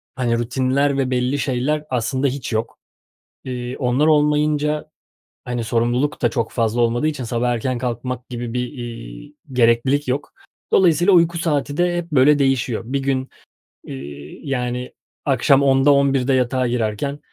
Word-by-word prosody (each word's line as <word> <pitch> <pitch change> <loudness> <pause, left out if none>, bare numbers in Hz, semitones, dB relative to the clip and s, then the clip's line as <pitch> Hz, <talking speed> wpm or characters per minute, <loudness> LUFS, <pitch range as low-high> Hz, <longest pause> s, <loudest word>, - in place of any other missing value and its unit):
hani, 120 -2 0
rutinler 130 +3 +1
ve 135 -2 0
belli 125 +3 0
şeyler 140 +3 -1
aslında 130 +2 0
hiç 135 -2 -4
yok. 110 +1 -2 0.7
Eee, 125 -1 -4
onlar 130 +4 +2
olmayınca, 150 0 +2 0.6
hani, 120 -1 -3
sorumluluk 120 +5 0
da - - +3
çok 115 -5 -2
fazla 115 0 0
olmadığı 120 +5 +1
için 150 -4 -3
sabah 120 +1 -1
erken 120 +1 -1
kalkmak 125 +1 -4
gibi 120 -1 -5
bir, 125 +1 -3
iii, 120 +4 -9 0.2
gereklilik 125 +4 +2
yok. 135 +3 -2 0.4
Dolayısıyla 175 +1 +4
uyku 170 -1 +4
saati 150 -3 -1
de 175 0 +1
hep, 170 -1 -5
böyle, 145 +1 +5
değişiyor. 130 -4 +1
Bir 135 +4 -2
gün, 135 -1 -1 0.6
eee, 70 +2 -9
yani, 125 -2 -3 0.3
akşam 140 0 +3
10'da, 135 +1 +4
11'de 135 -2 +2
de 135 - +3
yatağa 130 0 +1
girerken 120 +4 -2
130 Hz, 150 wpm, -20 LUFS, 120-145 Hz, 0.7 s, böyle